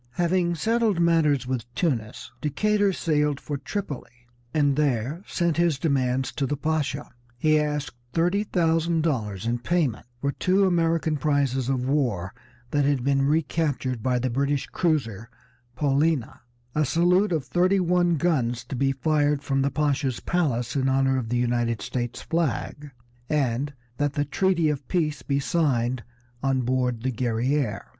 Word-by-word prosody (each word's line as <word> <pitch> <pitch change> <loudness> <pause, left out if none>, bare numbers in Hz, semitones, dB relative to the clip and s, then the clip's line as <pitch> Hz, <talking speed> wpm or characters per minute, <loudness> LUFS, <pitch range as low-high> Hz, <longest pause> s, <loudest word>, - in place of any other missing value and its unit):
Having 175 +2 +1
settled 220 +1 +1
matters 160 -5 +3
with 125 -2 -4
Tunis, 120 - -2
Decatur 205 +7 +2
sailed 150 -5 0
for 145 -2 -5
Tripoli, 140 - -6 0.3
and 145 -2 +2
there 140 +2 0
sent 170 -3 0
his 170 -4 +2
demands 130 -3 0
to 135 - -2
the 145 - -2
Pasha. 150 -1 -2 0.3
He 155 +3 +3
asked 150 -3 -2 0.2
thirty 175 +7 +1
thousand 165 -3 +1
dollars 110 - -2
in 120 +1 0
payment 140 -5 -1
for 140 +2 0
two 190 +6 +2
American 165 -3 +1
prizes 135 -3 0
of 130 -1 0
war 120 -10 0 0.4
that 145 -1 +2
had 140 -3 +1
been 140 +1 +2
recaptured 145 -5 0
by 125 +2 +1
the 125 0 -1
British 140 +2 0
cruiser 115 - -1 0.5
Paulina, 145 0 0 0.3
a 155 - +2
salute 180 +7 +3
of 155 -5 0
thirty 185 +2 +2
one 175 -1 +2
guns 130 -7 0
to - - -6
be 135 +2 +1
fired 145 0 +1
from 135 -1 0
the 140 - +2
Pasha's 140 -3 0
palace 135 -10 -1
in 135 -1 +1
honor 135 0 +2
of 115 -3 -5
the 120 - 0
United 120 -2 0
States 120 +3 -4
flag, 150 -2 -2 0.4
and 140 -1 0 0.3
that 145 -1 0
the 145 0 0
treaty 170 +2 +1
of 150 -3 -2
peace 150 -6 0
be 140 +2 0
signed 130 -6 0 0.4
on 135 -1 +1
board 125 -2 0
the 130 - 0
Guerrière. 120 +1 -1
145 Hz, 150 wpm, -25 LUFS, 130-165 Hz, 0.5 s, matters